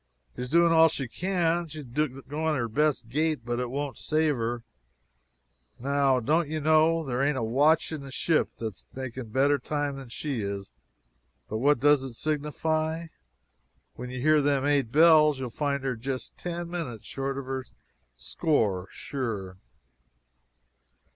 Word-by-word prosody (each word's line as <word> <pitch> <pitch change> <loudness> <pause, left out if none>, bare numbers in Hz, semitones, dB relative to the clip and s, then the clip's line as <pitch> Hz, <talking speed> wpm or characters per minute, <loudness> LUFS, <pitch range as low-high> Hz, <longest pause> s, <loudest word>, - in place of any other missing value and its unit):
She's 125 0 -5
doing 170 +2 +5
all 165 0 +7
she 135 -4 -4
can 175 +2 0
she's 155 -1 -8
going 150 +4 -2
her 120 -4 -1
best 135 0 +1
gait, 150 0 -1
but 120 0 -2
it 125 -1 -2
won't 140 +1 -4
save 155 -1 +1
her. 120 0 -2 1.2
Now, 135 0 +2
don't 150 +6 +1
you 155 0 -2
know, 160 +2 +4
there 125 -1 -1
ain't 140 0 +1
a 115 - -1
watch 145 +9 +3
in 155 -3 -4
the 135 - -9
ship 160 +3 +1
that's 110 -4 -6
making 130 -2 -6
better 140 +5 +3
time 145 +1 -2
than 135 -3 -9
she 135 0 -3
is, 100 -1 -4 0.8
but 110 - -3
what 145 +2 +3
does 145 +1 +5
it 135 -2 -6
signify? 155 +3 -1 0.8
When 125 +1 -7
you 130 0 -5
hear 155 +3 +4
them 140 -1 +1
eight 140 -5 +2
bells 155 -1 +6
you'll 130 -2 -5
find 140 +1 -1
her 130 -2 -1
just 130 +3 -5
about - - -21
ten 175 -1 -4
minutes 140 - -5
short 135 0 -3
of 140 - -5
her 130 0 -3 0.5
score 100 - 0
sure." 105 -9 -5
140 Hz, 160 wpm, -27 LUFS, 125-155 Hz, 1.2 s, all